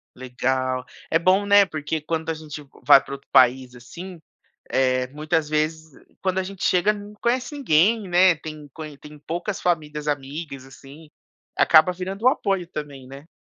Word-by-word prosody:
Legal. 130 0 -2 0.3
É 165 - +4
bom, 185 +4 +3
né, 205 0 +6
porque 155 -2 -4
quando 160 +1 -3
a - - +1
gente 155 -1 -9 0.2
vai 135 - +7
pra - - -8
outro 140 - -17
país, 125 0 +4
assim, 170 +9 -10 0.5
eh, 130 -1 +1
muitas 155 +2 -2
vezes 155 +1 -2 0.3
quando 185 -1 -1
a - - +1
gente 190 0 -8
chega 185 +4 +3
não 205 0 -10
conhece 245 +5 -1
ninguém, 215 - +2
né, 180 0 +5
tem 155 -1 -9
con 155 -2 -8
tem 150 +1 -14
poucas 175 +4 -4
famílias 150 -4 -2
amigas, 140 -1 -5
assim, 140 +3 -15 0.5
acaba 160 +3 +5
virando 190 +4 -6
um - - +10
apoio 195 - 0
também, 145 -5 -8
né? 140 +4 -12
155 Hz, 165 wpm, -23 LUFS, 140-185 Hz, 0.5 s, um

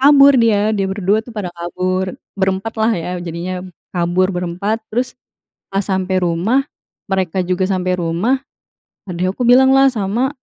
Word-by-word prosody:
Kabur 280 0 +7
dia, 215 -2 +3
dia 200 -2 0
berdua 200 +2 +1
itu 225 - -17
pada 185 -4 -4
kabur. 185 +2 -2 0.2
Berempat 195 +3 -1
lah 220 +1 +3
ya, 170 - -4
jadinya, 175 +2 -4 0.3
kabur 180 +2 +1
berempat. 180 +5 -2
Terus 250 +3 -1 0.5
pas 195 0 -1
sampe 190 -1 -1
rumah, 180 +10 +1 0.5
mereka 190 -1 0
juga 185 +1 0
sampe 185 -1 -1
rumah, 175 +10 0 0.7
adik 180 +1 -1
aku 250 - -8
bilanglah 265 +2 +6
sama 230 +2 -1
190 Hz, 145 wpm, -18 LUFS, 180-220 Hz, 0.7 s, Kabur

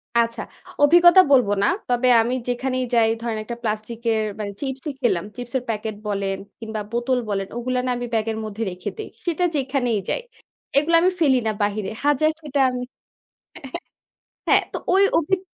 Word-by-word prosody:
আচ্ছা, 230 -1 +1 0.4
অভিজ্ঞতা 345 +4 +8
বলব 255 -5 +6 0.2
না। - - +4 0.2
তবে 245 +1 +2
আমি 235 +2 -1
যেখানেই 255 +1 -1
যাই 230 -2 +4
ধরেন 230 -2 -2
একটা 235 +2 -6
প্লাস্টিক 215 +1 -3
এর 220 - +1 0.2
মানে 205 -1 -3
চিপসই 270 +2 -4
খেলাম। 180 -8 +1
চিপস 245 +1 -8
এর 250 - -5
প্যাকেট 215 -1 -3
বলেন 195 -1 -1 0.2
কিংবা 220 -1 -5
বোতল 240 +2 0
বলেন 195 -1 -1
ওগুলা 250 +1 -1
না - - -1
আমি 245 - -4
ব্যাগের 220 0 0
মধ্যে 215 +1 -4
রেখে 180 0 -5
দেই, 435 - -6 0.2
সেটা 345 0 0
যেখানেই 260 -5 0
যাই - - 0 0.6
এগুলা 325 +4 +4
আমি 365 +2 +4
ফেলি 280 -6 +4
না - - +2
বাইরে 205 -1 -1 0.2
হাজার 295 +2 +3
সেটা 290 -2 -2
আমি। 250 0 -4 1.7
হ্যাঁ, - - +5
তো - - -3 0.2
ওই 390 +1 +5
অভিগ 365 +4 0
245 Hz, 170 wpm, -22 LUFS, 220-280 Hz, 1.7 s, অভিজ্ঞতা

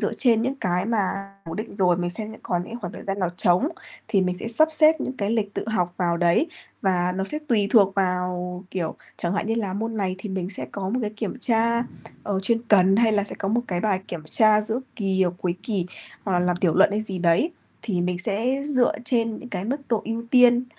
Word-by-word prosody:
dựa - - 0
trên 230 -3 +3
những 260 +3 -1
cái 180 +2 0
mà 195 -3 -1
cố 165 - -6
định 215 -1 -6
rồi, 180 -3 +3
mình 175 -1 -2
xem 215 +3 -4
những - - -13
còn 175 -1 -1
những 235 +3 -8
khoảng 180 -2 -5
thời - - -9
gian 195 0 -3
nào 180 -3 +1
trống 180 - +3 0.4
thì 195 - +3
mình 180 -1 -1
sẽ - - -5
sắp 310 +8 +4
xếp 310 0 +5
những 260 -1 -3
cái 205 -1 -1
lịch 210 -3 -1
tự - - -4
học 180 -5 0
vào 170 -2 +1
đấy 175 - +3 0.4
và 180 -2 +1
nó 190 - 0
sẽ 300 +8 -2
tùy 210 -4 +2
thuộc 195 -4 +5
vào, 180 -1 -1
kiểu, 170 -4 -2 0.2
chẳng 170 - -2
hạn 205 - -1
như 225 - 0
là 205 -5 -2
môn 225 +3 -3
này 190 -3 -1
thì 210 - -6
mình 190 -1 -3
sẽ 130 -10 -3
có 190 -1 -3
một 250 +5 -1
cái 210 - -1
kiểm 220 +4 -5
tra, 235 0 +2 0.4
ờ, 195 -2 -1
chuyên 230 +3 +1
cần 195 -1 +5
hay 225 -1 +4
là 205 -1 +2
sẽ - - -3
có 195 - -2
một 235 +3 +2
cái 175 -2 -1 0.3
kiểm 170 -3 -5
tra 215 -1 +5
giữa 220 +4 -1 0.2
kỳ 190 -2 +1
hoặc 175 0 -1
cuối 175 -1 -1
kỳ, 195 -6 -1 0.4
hoặc 195 - -1
là 180 - +3
làm 180 0 +1
tiểu 175 -3 +1
luận 190 - +5
hay 210 - 0
gì 195 -4 -2
đấy, 175 - +3 0.3
thì 190 -6 -1
mình 175 0 -1
sẽ 230 +8 0
dựa 260 -4 +3
trên 230 -3 +1
những 250 - -10
cái 185 - -4
mức 270 +6 -2
độ 230 -3 +1
ưu 230 +1 -3
tiên, 245 -1 +6
200 Hz, 250 wpm, -24 LUFS, 180-230 Hz, 0.4 s, tiên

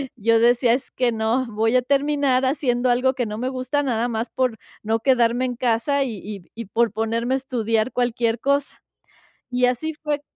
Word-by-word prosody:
yo 230 0 +2
decía: 240 0 +4
"Es 255 - -3
que 245 -2 0
no. 225 +3 0
Voy 225 +3 0
a 250 - +5
terminar 280 -1 +1
haciendo 255 -3 +1
algo 255 +2 +2
que 250 -2 -2
no 210 0 -5
me 255 +2 -2
gusta, 260 +3 -1
nada 240 -2 0
más 230 0 -3
por 250 -4 -1 0.3
no 225 +1 0
quedarme 245 0 +2
en 250 -1 -3
casa 250 +4 +1
y 225 -7 -5
y 200 -2 -7
y 230 -1 -6
por 230 +3 +1
ponerme 230 +3 -1
a - - +1
estudiar 230 -3 -1
cualquier 235 -2 0
cosa." 280 +2 -1 0.7
Y 250 0 +2
así 280 +6 -1
fue. 295 -1 -3
245 Hz, 190 wpm, -22 LUFS, 230-260 Hz, 0.7 s, a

